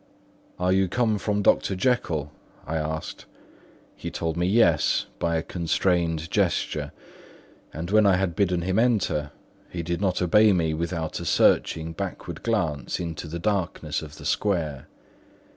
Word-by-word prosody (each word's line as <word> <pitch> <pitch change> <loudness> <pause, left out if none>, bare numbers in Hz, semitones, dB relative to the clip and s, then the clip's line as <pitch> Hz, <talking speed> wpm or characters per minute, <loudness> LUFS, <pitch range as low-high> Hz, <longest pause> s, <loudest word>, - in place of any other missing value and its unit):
"Are 90 +1 +1
you 95 0 +3
come 110 +1 +1
from 105 0 -1
Dr. 95 - +3
Jekyll?" 90 - 0 0.3
I 80 - -3
asked. 80 0 -4 0.7
He - - -6
told 80 -1 -3
me 85 +1 0
"yes" 90 -7 +3
by 85 -1 0
a 80 - 0
constrained 85 -1 0
gesture; 75 -1 0 0.8
and 85 +4 -5
when 110 -1 +5
I 95 - +5
had 90 -2 -1
bidden 90 -3 +1
him 95 +3 +1
enter, 105 -11 +1 0.4
he 85 -1 -4
did 85 +2 -2
not 95 -3 +1
obey 105 +4 +5
me 80 -3 +1
without 85 0 -3
a - - -6
searching 80 0 +2
backward - - -6
glance 85 - -1
into 85 -2 -5
the 80 +2 -5
darkness 85 -5 -1
of 75 -2 -10
the - - -11
square. 80 -9 -1
85 Hz, 150 wpm, -25 LUFS, 80-95 Hz, 0.8 s, when